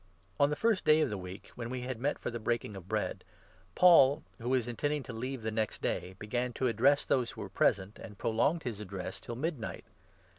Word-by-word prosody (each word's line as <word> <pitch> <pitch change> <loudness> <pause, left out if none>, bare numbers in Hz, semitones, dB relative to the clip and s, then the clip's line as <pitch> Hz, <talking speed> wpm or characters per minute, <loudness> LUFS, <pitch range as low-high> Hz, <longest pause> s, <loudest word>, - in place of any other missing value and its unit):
On 140 0 +5
the 150 - 0
first 220 +2 +2
day 155 +1 +5
of 155 - +1
the - - -1
week, 90 +3 -9
when 120 -1 -6
we 130 0 -3
had 125 -2 -4
met 145 +4 0
for - - -4
the 120 - -3
7 110 - -11
Breaking 115 -3 -1
of 95 -2 -9
Bread, - - -2 0.5
Paul, 155 -5 +7 0.2
who 120 +1 -3
was 130 -3 +2
intending 145 +4 -1
to 125 - -8
leave 125 +1 -4
the 110 - -1
next 110 -1 -1
day, 95 +1 -2
began 120 +4 -2
to 130 - -1
address 130 +5 +3
those 125 -3 +1
who - - -8
were - - -6
present, 95 +2 +1
and 105 - -10
prolonged 130 +11 +1
his 115 -5 -4
address 95 -2 -6
till 120 - -7
midnight. 135 -3 -4
120 Hz, 225 wpm, -32 LUFS, 110-140 Hz, 0.5 s, Paul